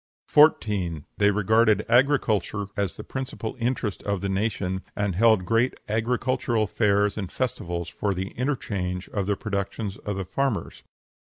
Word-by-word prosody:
14. 100 - +3
They 105 0 +5
regarded 110 +1 +3
agriculture 115 -6 +2
as 100 -3 -2
the - - -7
principal 130 -4 -5
interest 115 -4 -1
of 100 -2 -2
the 100 - -2
nation, 95 -2 -1
and 100 -2 0
held 110 0 +4
great 115 +6 +2
agricultural 120 +1 0
fairs 105 0 +1
and 95 -3 -5
festivals 85 -9 -3
for 95 +3 -2
the 95 +2 -3
interchange 100 -9 -3
of 100 -3 -2
the 100 - +2
productions 100 -1 -3
of 105 -2 -4
the 95 - -3
farmers. 125 +3 -2
105 Hz, 140 wpm, -25 LUFS, 95-115 Hz, -, They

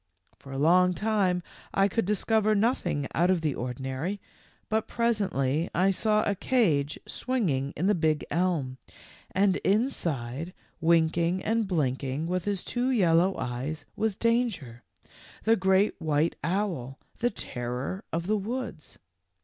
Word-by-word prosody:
For 135 - -12
a 135 - -4
long 180 +5 +4
time 195 -3 +1 0.3
I 195 0 +4
could 225 +1 0
dis 210 0 -1
cover 215 -1 +3
nothing 205 - 0
out 175 +3 +2
of 185 -3 +2
the 155 -3 0
ordinary, 130 +10 -4 0.5
but 220 0 0
pres 235 -2 +1
ently 150 -4 0
I 185 +3 +4
saw 215 +2 +2
a 205 - +1
cage 170 - +1
swinging 160 - -1
in 170 - 0
the 210 - +4
big 155 -4 +1
elm, 150 -7 0 0.5
and 195 0 +2
inside, 170 - -1 0.2
winking 170 +2 +2
and 225 -1 +1
blinking 140 -3 -1
with 180 +1 -2
his 200 -3 -1
two 245 +1 -1
yel 195 -10 +3
low 185 +3 +2
eyes, 130 +5 -4
was 215 -2 -1
Danger, 225 - 0 0.6
the 225 +1 +4
great 190 0 +3
white 155 +1 +1
owl, 165 -7 -2 0.2
the 240 - +2
terror 125 - -4
of 165 +1 -2
the 215 +3 +1
woods. 200 - -5
180 Hz, 145 wpm, -28 LUFS, 145-210 Hz, 0.6 s, long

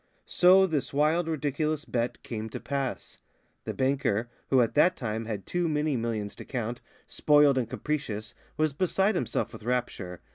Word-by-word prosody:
So 185 +2 +6
this 155 -7 -2
wild, 160 +4 +2
ridiculous 155 0 -1
bet 120 0 -2
came 110 -1 -5
to - - -6
pass. 140 -2 -4 0.5
The - - -3
banker, 130 -4 0 0.2
who 135 - +4
at 115 - +1
that 175 +5 +4
time 110 -2 -3
had 105 -3 -5
too 175 -1 -1
many 150 -1 0
millions 115 -4 -2
to - - -8
count, 120 -2 -4 0.2
spoiled 145 -2 +4
and 120 -3 -2
capricious, 115 -9 -3 0.2
was 155 -2 +1
beside 190 +6 +1
himself 125 - -2
with 110 - -9
rapture. 105 -7 -3
135 Hz, 160 wpm, -28 LUFS, 115-155 Hz, 0.5 s, So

